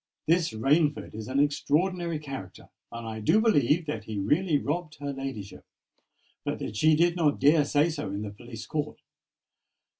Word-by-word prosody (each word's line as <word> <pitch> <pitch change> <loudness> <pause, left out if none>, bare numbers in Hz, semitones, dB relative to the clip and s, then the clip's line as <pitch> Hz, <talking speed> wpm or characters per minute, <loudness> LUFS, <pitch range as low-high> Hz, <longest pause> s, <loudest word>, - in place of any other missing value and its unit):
—"This 165 +1 +3
Rainford 145 +7 +1
is 110 0 -7
an 130 +2 0
extraordinary 165 +4 +1
character; 135 -11 -8 0.2
and 115 -1 -7
I 110 0 -5
do 110 - +3
believe 165 - +3
that 115 -8 -4
he 110 -2 -5
really 150 - +2
robbed 155 +2 -3
her 145 -1 -5
ladyship, 110 -9 -6 0.8
but - - -2
that - - -6
she 155 +8 +4
did 170 +2 +3
not 155 -4 +2
dare 150 +1 +5
say 145 +2 +3
so 150 -8 -4
in 100 +2 -4
the 105 - -5
police 115 +2 -9
court. 150 -1 -3
145 Hz, 170 wpm, -27 LUFS, 110-160 Hz, 0.8 s, dare